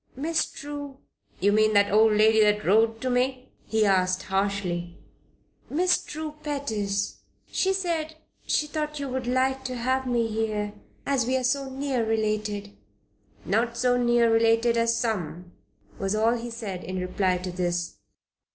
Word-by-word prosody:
"Miss 315 +5 0
True 285 -1 -7 0.2
" - - -36
"You 200 +2 +4
mean 215 +1 +3
that 200 -1 +4
old 215 +1 +5
maid 220 +1 +5
that 210 0 +3
wrote 225 +4 +3
to 255 - -1
me?" 255 +1 0 0.2
he 220 -1 +2
asked, 185 -1 +2
harshly. 190 -3 -2 0.7
"Miss 360 +4 +2
True 310 0 -6
Pettis. 215 -9 -2 0.3
She 380 - +1
said 335 -5 -2 0.3
she 305 - +2
thought 300 0 -4
you 280 - -3
would 255 -1 -3
like 260 +1 +1
to 255 -1 -3
have 260 +2 0
me 240 -2 +1
here 215 -2 -2 0.3
as 270 -4 +1
we 260 +1 +2
were 260 - -2
so 270 +2 0
near 265 -2 -1
related." 215 -2 -2 0.7
"Not 235 +3 0
so 245 +1 +2
near 240 -1 +3
related 230 +1 +3
as 230 0 +2
some," 180 -6 -3 0.5
was 195 +2 -1
all 225 +2 +3
he 240 0 -5
said 210 -6 -6
in 185 0 -5
reply 185 0 0
to 180 0 -5
this. 175 - -2
225 Hz, 160 wpm, -26 LUFS, 205-260 Hz, 0.7 s, old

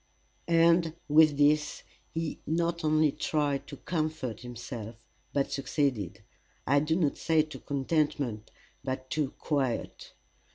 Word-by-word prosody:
And 165 -1 +4
with 150 -1 +6
this 150 +1 +2 0.3
he 165 -1 -3
not 170 +2 0
only 155 -1 +4
tried 145 -2 -1
to - - -8
comfort 155 -8 -2
himself, 120 -2 -7 0.4
but 140 -1 0
succeeded 120 - -1 0.4
I 140 +3 +4
do 155 +2 +1
not 160 -5 +1
say 160 -1 +3
to 155 0 -9
contentment, 140 -6 -1 0.3
but 130 -1 -4
to 150 -3 0
quiet. 135 -6 -2
150 Hz, 120 wpm, -29 LUFS, 130-160 Hz, 0.4 s, with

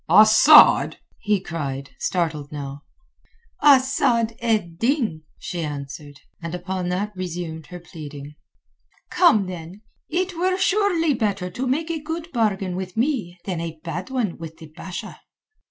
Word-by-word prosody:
"Asad?" 220 - +7 0.2
he 210 -2 +1
cried, 140 -7 -5
startled 160 -5 -2
now. 140 -1 -6 0.8
"Asad 260 -5 +4
ed 210 -8 -1
Din," 230 - 0 0.2
she 175 - -5
answered, 145 -1 -7 0.2
and 170 +1 -4
upon 180 0 -3
that 200 +4 -2
resumed 170 -3 -5
her 180 - -9
pleading. 150 -4 -10 0.8
"Come, 210 -3 +4
then! 180 +3 -8 0.3
It 365 +2 -1
were 370 +2 +1
surely 375 -5 +2
better 200 -7 -1
to 255 +8 -3
make 315 +6 0
a 320 -2 -3
good 325 +2 -5
bargain 200 -6 0
with 185 0 -6
me 230 - -1
than 180 -4 -3
a 165 -1 -6
bad 170 - -5
one 245 -11 -2
with 160 -1 -8
the 160 -2 -13
Basha." 180 0 -7
185 Hz, 140 wpm, -23 LUFS, 165-255 Hz, 0.8 s, Asad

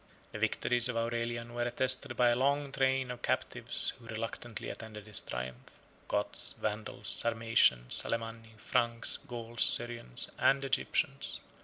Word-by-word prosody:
The - - -6
victories 125 0 +2
of 120 - -2
Aurelian 115 0 -2
were 120 - -3
attested 125 +1 +2
by 120 -1 +5
the - - +2
long 140 +2 +1
train 130 -1 +1
of 120 -1 -8
captives - - -2
who 115 - -15
reluctantly 115 0 -5
attended 105 -2 -9
his 105 -2 +8
triumph, 60 +1 -7 0.3
Goths, - - -1
Vandals, 105 -1 -3
Sarmatians, 115 - +3
Alemanni, 115 -1 -5
Franks, 120 0 +2
Gauls, 120 -4 -6
Syrians, 120 - +1
and 135 0 +3
Egyptians. 135 - -1
115 Hz, 135 wpm, -32 LUFS, 110-125 Hz, 0.3 s, his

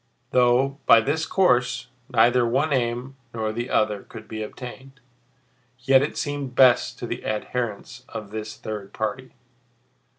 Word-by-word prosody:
Though, 130 +2 +3
by 115 - +8
this 150 +8 -1
course, 125 -10 +2 0.2
neither 120 0 +4
one 135 +6 +1
aim 125 +1 -2 0.2
nor 110 -1 -1
the 120 +3 -4
other 105 -2 +1
could 110 +1 -12
be 110 0 -6
attained, 130 +4 -9 0.8
yet 130 +1 +4
it 145 - -2
seemed 145 -3 -3
best 125 -2 +4
to - - -5
the - - -5
adherents 120 +2 -4
of 105 -2 -7
this 110 0 -6
third 105 -2 -7
party. 110 +4 -4
125 Hz, 140 wpm, -24 LUFS, 110-135 Hz, 0.8 s, by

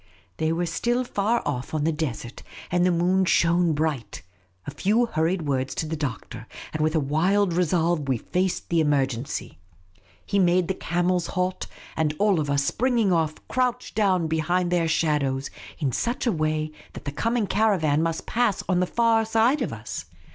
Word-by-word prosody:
They 160 0 0
were 170 +2 0
still 240 +9 0
far 230 0 0
off 140 +1 -3
on 150 - 0
the 165 - +2
desert, 130 -7 -4 0.3
and 175 0 +2
the 180 - +4
moon 180 +2 +2
shone 170 -2 +3
bright. 150 -6 -2 0.4
A - - -5
few 210 - +2
hurried 170 -3 0
words 135 -2 -1
to - - -2
the 160 +1 -3
Doctor, 140 -8 -5 0.3
and 155 - -2
with 155 +1 +1
a - - +4
wild 175 +7 +2
resolve 170 -3 +1
we 130 - +2
faced 185 +9 -2
the 165 -2 +3
emergencj'. 135 - -1 0.7
He 200 - 0
made 180 -1 +3
the 190 - 0
camels 175 0 0
halt, 185 0 -2 0.3
and 155 -1 0
all 200 -3 +3
of 145 -2 -2
us, 140 0 +2
springing 235 - +1
off, 160 -2 +1
crouched 250 -1 -1
down 190 -5 +2
behind 175 +3 0
their 170 -2 +2
shadows 145 -4 0 0.3
in 140 -5 -1
such 240 - -2
a 235 - +3
way 155 -2 -1 0.2
that - - -10
the 140 - -2
coming 230 +9 0
caravan 190 -8 +2
must 165 0 -2
pass 230 -4 0
on 185 -2 +2
the 180 - +1
far 230 0 +3
side 225 +6 +2
of - - -1
us. - - -6
170 Hz, 180 wpm, -25 LUFS, 155-195 Hz, 0.7 s, the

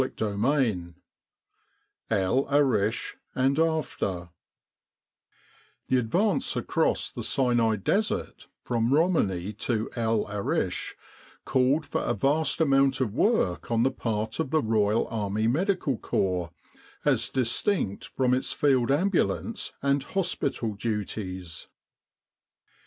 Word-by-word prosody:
CHAPTER 105 -2 -3 0.3
IX 90 -9 -1 1.2
EL 110 +6 +1
ARISH 120 -6 +1 0.2
AND 135 +3 +2
AFTER 150 - -1 1.6
THE 130 - +4
advance 175 - +1
across - - 0
the - - -6
Sinai 120 -4 +2
Desert 200 - -1 0.2
from 120 0 0
Romani 105 - +1
to 110 -1 -2
El 115 -2 +1
Arish 105 -1 -2 0.5
called 135 +4 +2
for - - -2
a - - -1
vast 150 +2 +1
amount 135 -3 +3
of 120 -6 -1
work 115 - +1
on 115 0 +2
the 135 - +2
part 110 -2 -3
of 160 - -1
the 155 0 +1
Royal 110 0 +2
Army 110 -1 -1
Medical 160 - 0
Corps, 90 -3 -1 0.6
as - - +2
distinct 130 - 0
from 125 -1 0
its 130 - 0
Field 130 -4 +2
Ambulance 195 +8 0
and 140 0 +2
hospital 140 - -1
duties. 100 -5 -4
120 Hz, 110 wpm, -27 LUFS, 105-140 Hz, 1.6 s, THE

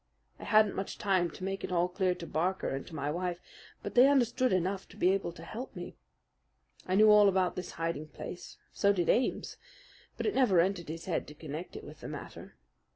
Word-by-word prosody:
I - - -8
hadn't 215 -1 +4
much 195 - -4
time 185 -4 +1
to 185 - -10
make 195 +1 -3
it - - -4
all 175 0 +2
clear 185 0 0
to 170 - -8
Barker 180 +4 -1
and 135 0 -4
to 160 - -9
my 145 0 -2
wife; 175 +1 -2 0.4
but - - -5
they 250 +2 +7
understood 255 -2 +3
enough 185 +1 0
to - - -16
be 180 - +4
able 195 -3 -1
to 165 - -11
help 235 +9 -7
me. 175 -1 -7 0.9
I 185 - +1
knew 215 +1 +7
all 210 -1 +7
about 185 -2 +1
this 180 - -6
hiding 165 -2 -3
place, 175 - -9 0.2
so 200 0 +3
did 175 -3 0
Ames; 250 - +1 0.6
but - - -3
it 425 - +1
never 235 -10 +4
entered 175 -2 +1
his 165 +1 -6
head 175 - -2
to 150 - -11
connect 155 +3 -7
it - - -7
with - - -11
the - - -8
matter. - - -9
185 Hz, 220 wpm, -31 LUFS, 170-200 Hz, 0.9 s, they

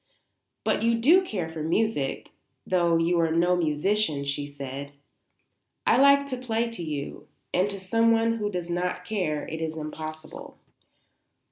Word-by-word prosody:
"But - - +1
you 230 +1 +3
do 325 +11 +5
care 190 - -3
for 160 -1 -7
music, 165 -3 -1 0.3
though 170 -2 +2
you 170 +1 +2
are 165 -1 +2
no 175 +2 +3
musician," 160 -1 0
she 140 +1 -2
said. 140 0 -7 0.9
"I - - +4
like 280 +1 +6
to 255 - -3
play 235 -2 -1
to 230 - -5
you; 150 -4 -5 0.3
and 185 +3 +2
to 200 -1 -6
someone 230 +3 +2
who 210 -2 -1
does 175 -3 -4
not 180 +1 -2
care 180 -8 -2
it 160 0 -5
is 160 0 -3
impossible." 155 0 -7
175 Hz, 150 wpm, -26 LUFS, 155-225 Hz, 0.9 s, like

